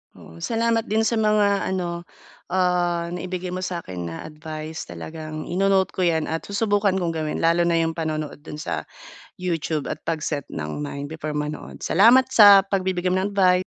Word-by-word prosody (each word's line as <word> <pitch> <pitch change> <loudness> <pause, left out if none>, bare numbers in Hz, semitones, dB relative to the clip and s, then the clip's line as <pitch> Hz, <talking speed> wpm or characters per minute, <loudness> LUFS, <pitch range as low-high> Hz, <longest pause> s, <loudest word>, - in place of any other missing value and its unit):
Oo. 80 - -14
Salamat 230 - 0
din 220 +2 +1
sa 225 0 +1
mga 210 -2 +2
ano, 175 -2 -3 0.4
ah, 175 -2 +1
naibigay 180 0 -4
mo 185 - -3
sa 180 -2 -3
akin 90 -2 -6
na 80 - -6
advice. 155 0 -7
Talagang 155 -1 -7
ino-note 190 0 +1
ko - - -10
'yan 160 -2 +1
at 160 - -3
susubukan 205 -1 +1
kong 175 -3 0
gawin 155 -1 -3
lalo 170 +1 +3
na 170 - +2
yung 165 0 +2
panonood 155 -3 -4
do'n 150 0 -9
sa - - -4 0.5
YouTube 165 -4 -2
at - - -5
pag-set 155 -3 -2
ng 75 - -4
mind 140 0 -5
before 155 0 -5
manood. 150 0 -5
Salamat 240 +7 +5
sa 205 -2 +10
pagbibigay 185 -2 -1
mo 185 +1 +2
ng 205 - -2
advice. 185 -2 +4
175 Hz, 175 wpm, -23 LUFS, 155-190 Hz, 0.5 s, sa